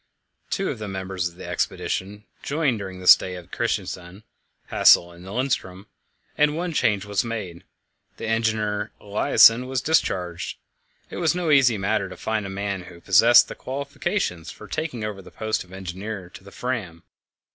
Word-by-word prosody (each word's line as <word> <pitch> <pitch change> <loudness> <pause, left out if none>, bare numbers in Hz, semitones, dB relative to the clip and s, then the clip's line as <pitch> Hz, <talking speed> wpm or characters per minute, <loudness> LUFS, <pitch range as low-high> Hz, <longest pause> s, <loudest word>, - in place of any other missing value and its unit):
Two 195 -1 -1
of 125 - -7
the 105 - -5
members 95 -2 -3
of 85 - -19
the - - -10
expedition 105 +3 -3 0.2
joined 140 -6 0
during 95 -2 -7
the - - -9
stay 90 0 +6
at 90 -1 -11
Christiansand 90 +3 -3 0.5
Hassel 85 0 +5
and 85 +1 -14
Lindström 100 -4 -2 0.5
and 150 +1 +2
one 175 0 -2
change 105 -8 +1
was 100 -1 0
made: 105 -8 -5 0.5
the - - -6
engineer 110 -2 0
Eliassen 115 +4 +5
was 130 -1 -1
discharged. 95 - -1 0.5
It - - -6
was 170 -1 +1
no 175 -3 0
easy 130 -6 +5
matter 100 0 0
to - - -10
find 110 -2 -2
a - - -6
man 100 -1 -4
who 90 -1 -12
possessed 105 +7 +6
the - - -7
qualifications 140 - -3
for 105 - -11
taking 150 -7 -4
over 105 -2 -4
the - - -13
post 110 0 -2
of 90 - -21
engineer 95 0 -6
to - - -13
the 100 - -13
Fram. 105 -11 -4
105 Hz, 170 wpm, -24 LUFS, 95-125 Hz, 0.5 s, stay